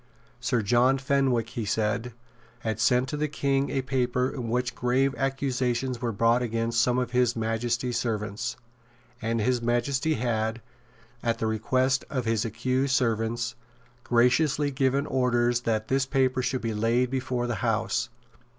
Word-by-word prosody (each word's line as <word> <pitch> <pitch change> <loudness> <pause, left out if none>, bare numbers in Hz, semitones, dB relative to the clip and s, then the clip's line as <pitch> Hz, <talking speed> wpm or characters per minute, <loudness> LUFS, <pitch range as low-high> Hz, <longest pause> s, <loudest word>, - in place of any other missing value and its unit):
Sir 120 -2 0
John 125 +5 +3
Fenwick, 130 -4 +1
he 115 -1 -4
said, 110 +3 -1 0.5
had 110 -1 -2
sent 125 +3 +3
to 150 - -3
the 150 +1 0
King 140 -1 0
a 135 -2 -1
paper 125 -1 0
in 120 -4 -5
which 125 +1 0
grave 130 +2 +1
accusations 130 -2 -1
were 120 -2 -1
brought 115 +3 +2
against 115 0 0
some 125 0 +2
of 125 -1 -1
His 125 -1 +2
Majesty's 120 +2 -1
servants; 110 -2 -3 0.6
and 115 0 -1
His 125 +2 +1
Majesty 130 +6 +1
had, 110 -1 -1 0.6
at 115 -1 0
the 115 - -2
request 130 +5 +1
of 130 -4 -2
his 115 0 +1
accused 130 +4 0
servants, 115 0 0 0.5
graciously 130 +4 +2
given 135 +1 +1
orders 120 -3 +1
that 110 -2 -1
this 135 +2 +1
paper 130 -1 +1
should 130 0 -1
be 115 -1 -2
laid 115 +4 +1
before 130 -2 -1
the 120 - -1
House. 115 +1 0
125 Hz, 150 wpm, -27 LUFS, 115-130 Hz, 0.6 s, John